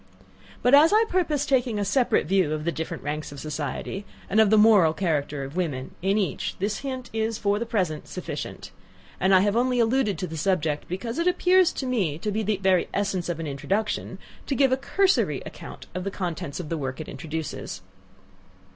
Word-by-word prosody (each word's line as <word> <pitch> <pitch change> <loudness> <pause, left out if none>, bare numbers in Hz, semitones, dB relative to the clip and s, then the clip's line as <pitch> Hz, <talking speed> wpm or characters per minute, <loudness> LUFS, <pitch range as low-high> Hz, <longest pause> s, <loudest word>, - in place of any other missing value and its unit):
But 245 - +4
as 300 +3 +8
I 435 +2 +5
purpose 310 -7 0
taking 250 -5 +1
a 205 - 0
separate 240 +5 +2
view 180 -3 +2
of 155 0 -3
the 170 - +1
different 160 -1 -5
ranks 150 +1 -4
of 145 - -9
society, 150 +6 -4 0.3
and 215 - +3
of 215 - +4
the 220 - +5
moral 210 -7 +6
character 150 -5 -1
of 135 +3 -8
women, 145 -8 -2
in 195 +3 +2
each, 200 -3 -1
this 200 +2 -2
hint 260 -3 -5
is, 220 0 -1
for 205 -1 +1
the 235 - -3
present, 180 -9 -1
sufficient; - - -6 0.5
and 190 +2 +2
I 190 -1 +7
have 205 +1 +1
only 250 +1 +2
alluded 230 -4 +2
to 185 - -3
the 160 -2 -6
subject, 155 -3 0
because 230 - -4
it 335 - +1
appears 360 0 +4
to 265 - -4
me 200 - 0
to 210 +6 -3
be 215 +2 -1
the 215 -1 0
very 190 -2 +2
essence 195 -3 -1
of 170 -2 -2
an 165 - -3
introduction 190 +10 -2 0.3
to 275 - 0
give 270 0 +4
a - - +5
cursory 385 +7 +1
account - - -9
of 185 - -4
the 195 - -2
contents 175 -6 -4
of 165 -4 -6
the 165 - -2
work 130 0 -4
it 155 - -6
introduces. 160 -1 -5
195 Hz, 205 wpm, -25 LUFS, 160-240 Hz, 0.5 s, as